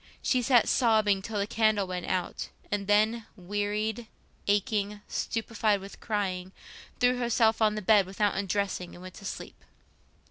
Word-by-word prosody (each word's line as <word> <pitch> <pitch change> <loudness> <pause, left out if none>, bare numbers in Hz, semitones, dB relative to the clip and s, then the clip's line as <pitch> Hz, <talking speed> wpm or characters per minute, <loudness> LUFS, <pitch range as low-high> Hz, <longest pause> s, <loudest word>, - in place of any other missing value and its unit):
She 255 - +2
sat 245 -1 +4
sobbing 215 -5 +3
till 215 +2 -5
the 200 - +1
candle 215 -2 +2
went 180 -1 -5
out, 185 -2 -2 0.2
and 200 -1 -1
then, 215 +2 +2
wearied, 205 +4 -2 0.4
aching, 205 0 0
stupefied 220 -2 0
with 195 +1 -11
crying, 190 -4 -2 0.5
threw 250 0 +3
herself 230 -2 +2
on 215 -1 +3
the 215 - -4
bed 200 -1 +5
without 205 +2 0
undressing 195 -2 -2
and 175 - -12
went 185 -1 -9
to 200 - -12
sleep. - - -7
205 Hz, 150 wpm, -28 LUFS, 195-220 Hz, 0.5 s, bed